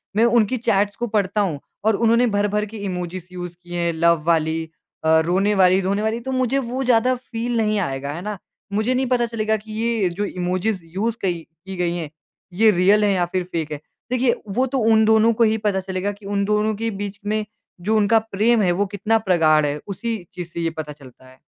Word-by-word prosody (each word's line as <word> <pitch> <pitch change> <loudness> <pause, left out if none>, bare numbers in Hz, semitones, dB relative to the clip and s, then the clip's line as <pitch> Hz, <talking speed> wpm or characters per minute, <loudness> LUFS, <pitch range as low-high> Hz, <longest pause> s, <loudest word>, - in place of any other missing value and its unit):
मैं 225 +2 +4
उनकी 235 0 +3
चैट्स 205 -3 +1
को 240 - -3
पढ़ता 210 -1 0
हूँ 170 -8 -1 0.3
और 220 -1 +4
उन्होंने 230 +3 +3
भर-भर 205 +1 +1
के 215 +1 -9
इमोजीज़ 180 -3 -5
यूज़ 175 -1 -6
किए 175 0 -6
हैं 170 0 0
लव 165 -1 +2
वाली, 160 -1 +2 0.4
अ, 160 0 +5
रोने 190 +4 +2
वाली 185 -1 +5
रोने 195 +2 0
वाली 220 +2 -1
तो 265 +3 -5
मुझे 255 0 +1
वो 255 +1 -3
ज़्यादा 250 0 +3
फ़ील 240 -1 -4
नहीं 215 -2 +1
आएगा। 140 -5 -3
है 170 - -6
ना? 210 +1 -4 0.4
मुझे 220 +5 +1
नहीं 260 +1 +1
पता 245 -1 +2
चलेगा 220 -1 -1
कि 215 +1 -13
ये 225 -3 0
जो 195 +4 -3
इमोजीज़ 185 +2 -2
यूज़ 225 +4 -1
कई 175 -3 -1 0.3
की 190 0 -6
गई 175 -1 -1
हैं 165 -4 -4 0.4
ये 220 +4 +5
रियल 200 +3 +4
हैं 205 - +3
या 180 -2 +1
फिर 185 -1 +1
फ़ेक 160 -2 -3
हैं। 150 - -4 0.3
देखिए 250 -1 +2
वो 240 +6 +1
तो 265 +1 -1
उन 220 0 +5
दोनों 220 +1 +4
को 230 +1 +2
ही 220 0 +3
पता 200 -2 +1
चलेगा 190 +1 -3
कि 205 0 -14
उन 200 0 0
दोनों 210 +1 +1
के 225 +2 -2
बीच 205 0 -5
में 215 +1 -1 0.4
जो 215 +5 +1
उनका 215 +2 +4
प्रेम 220 +1 +1
है 180 -3 +3
वो 195 +4 +1
कितना 215 +3 +2
प्रगाढ़ 155 -4 +4
है। 145 0 -1
उसी 225 +4 -3 0.2
चीज़ 175 -2 -6
से 170 - -6
ये 165 - 0
पता 150 -1 -5
चलता 130 -3 -16
है। 130 0 -19
205 Hz, 225 wpm, -21 LUFS, 180-225 Hz, 0.4 s, अ